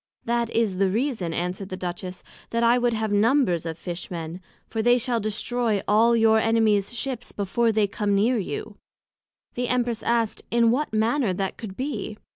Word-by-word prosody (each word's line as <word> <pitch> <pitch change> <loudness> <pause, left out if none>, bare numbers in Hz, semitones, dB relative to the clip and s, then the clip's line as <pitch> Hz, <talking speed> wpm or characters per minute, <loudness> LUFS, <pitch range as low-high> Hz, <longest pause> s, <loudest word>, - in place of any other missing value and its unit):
That 235 0 0
is 220 -6 0
the 195 0 +2
reason, 220 - -1
answered 180 +3 -3
the 185 - -5
Duchess, 180 0 -5 0.3
that 230 0 0
I 235 +1 +5
would 240 -1 +1
have 220 -1 -1
numbers 205 - +2
of 160 -1 -5
Fish 175 0 -6
men, 170 0 -6 0.3
for 225 - -2
they 240 +2 +4
shall 245 -1 0
destroy 215 0 -1
all 225 +3 +4
your 220 -1 +5
Enemies 220 -3 +2
Ships, 250 -1 -4
before 225 +4 0
they 215 -1 +2
can 200 - -9
come 205 -1 +2
near 225 +4 +2
you. 425 - -5 0.8
The 245 0 -2
Empress 240 -2 0
asked 230 -2 0
in 235 -1 +4
what 290 +5 0
manner 220 0 +1
that 195 +1 -2
could 200 -4 -8
be? 230 -6 -4
220 Hz, 185 wpm, -25 LUFS, 195-235 Hz, 0.8 s, I